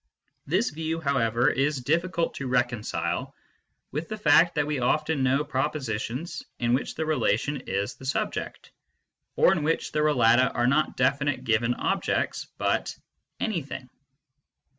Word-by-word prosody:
This 185 +10 +1
view, 160 +1 -3
how 140 -4 0
ever, 115 +2 +2
is 140 0 +1
difficult 170 +3 0
to 135 - -5
reconcile 125 -3 -1 0.6
with 155 +4 -4
the 215 - -4
fact 175 -4 +5
that 150 -2 +1
we 150 -2 -2
often 150 +4 +1
know 130 +3 +2
propositions 135 -1 -3 0.2
in 120 -1 +1
which 130 - -1
the 160 - -2
relation 145 -1 +1
is 100 +1 -1
the 130 - -13
subject, 135 - -3 0.6
or - - +5
in 190 -5 +1
which 160 +2 0
the 150 - -1
relata 130 -5 +4
are 120 - +2
not 150 +5 +2
definite 135 0 +1
given 115 0 +1
objects, - - -1
but - - -1 0.2
" - - -54
anything." 145 -10 -3
140 Hz, 145 wpm, -26 LUFS, 125-155 Hz, 0.6 s, fact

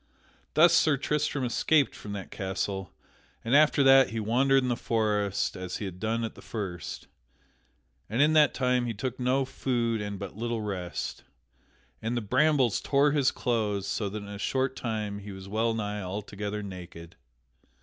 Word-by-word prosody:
Thus 170 +2 +7
Sir 155 -3 +4
Tristram 145 0 -1
escaped 140 +4 +2
from 105 - -8
that 100 -2 -7
castle 95 -1 -3 0.5
and 120 +4 +2
after 150 -1 +5
that 135 0 +7
he 115 - -3
wandered 130 +5 +3
in - - -1
the 120 - +1
forest 105 -4 0
as 90 -1 -5
he 105 - -5
had 90 -2 -7
done 115 +2 -1
at 115 - -3
the - - -14
first. 95 -6 -6 1.0
And 115 +4 -2
in 150 +2 +5
that 155 -1 +5
time 125 -2 +1
he 115 - -3
took 125 +5 -4
no 130 +2 +1
food 120 -4 -1
and 100 -1 -4
but 100 -1 -7
little 115 +1 -2
rest. 95 -4 -4 0.8
And 115 +2 -2
the - - 0
brambles 130 +1 +2
tore 140 +1 +3
his 140 -3 +3
clothes, 105 -5 -1
so 105 -1 -2
that 105 +1 -6
in - - -10
a 100 -1 -7
short 130 +3 0
time 105 -3 -3
he 100 0 -9
was 95 0 -9
wellnigh 110 -1 -1
altogether 105 +2 -5
naked. 90 -3 -9
110 Hz, 170 wpm, -28 LUFS, 100-130 Hz, 1.0 s, Thus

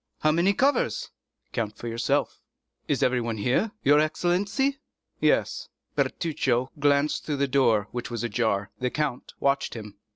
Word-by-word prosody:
"How 155 - +4
many 170 +5 +3
covers?" 285 - +1 0.4
"Count 110 -3 -2
for 120 - -7
yourself." 115 0 -1 0.5
"Is - - +1
everyone 120 -3 +1
here, 125 - +1
your 145 +2 +6
excellency?" 195 - +1 0.4
"Yes." - - +1 0.3
Bertuccio 135 -6 0
glanced 145 +1 +2
through 150 -2 -2
the 140 0 +1
door, 120 -7 +3
which 120 -1 -4
was 120 -2 -4
ajar. 105 -3 0
The 125 0 0
count 145 -3 -3
watched 140 -2 +1
him. 105 -3 -9
135 Hz, 140 wpm, -26 LUFS, 115-155 Hz, 0.5 s, your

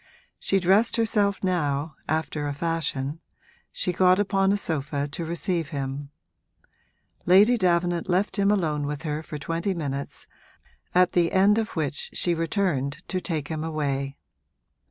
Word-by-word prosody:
She 195 - +1
dressed 195 +5 +3
herself 210 -4 +1
now, 155 -5 0 0.2
after 155 -1 -1
a 145 - -3
fashion; 155 -2 -2 0.5
she 180 - -2
got 185 +1 +4
upon 195 -1 +2
a 205 - +2
sofa 145 -5 -2
to 150 +4 -5
receive 170 -1 -2
him. 140 -1 -4 1.2
Lady 200 +7 +6
Davenant 175 -3 +1
left 190 +2 +1
him 200 0 +3
alone 155 -8 +1
with 145 -1 -4
her 150 0 -2
for 155 -1 -7
twenty 165 +6 -2
minutes, 140 -4 -4 0.7
at 180 0 +5
the 170 -1 +2
end 200 +3 +4
of 225 0 -4
which 150 -3 -2
she 175 - 0
returned 165 -4 -1
to 185 -1 -1
take 155 -5 -3
him 155 -1 -3
away. 140 -3 -2
165 Hz, 145 wpm, -25 LUFS, 145-190 Hz, 1.2 s, Lady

